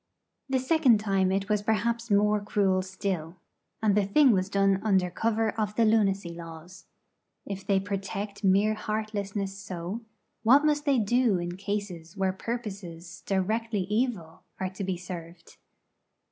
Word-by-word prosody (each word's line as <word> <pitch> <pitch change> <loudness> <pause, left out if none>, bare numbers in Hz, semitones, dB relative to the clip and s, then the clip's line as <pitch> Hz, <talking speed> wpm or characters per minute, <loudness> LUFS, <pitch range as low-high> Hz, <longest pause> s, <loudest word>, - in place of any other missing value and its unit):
The 265 - +2
second 260 -4 +4
time 195 -3 +1
it 195 +1 0
was 210 -1 +1
perhaps 230 +2 0
more 210 0 +3
cruel 195 -2 +1
still. 185 -3 -4 0.5
And 210 -2 +4
the 205 0 +3
thing 255 +8 +5
was 190 -2 +1
done 195 -1 +2
under 190 -4 +2
cover 225 +2 0
of 210 -1 -1
the 230 - +4
lunacy 195 -5 +2
laws. 170 +2 -10 0.6
If 195 -1 -6
they 195 -1 +3
protect 200 +1 -4
mere 200 +3 +4
heartlessness 210 -2 -3
so, 195 +1 -5 0.4
what 270 +6 +5
must 295 0 +2
they 280 -3 +3
do 235 -1 +2
in 175 0 -4
cases 195 -3 -5
where 190 -1 +1
purposes 190 -6 -6
directly 210 +2 0
evil 210 -4 -2 0.2
are 185 -1 -2
to 195 +1 -6
be 190 -1 -2
served? 170 -1 -9
200 Hz, 145 wpm, -28 LUFS, 185-220 Hz, 0.6 s, thing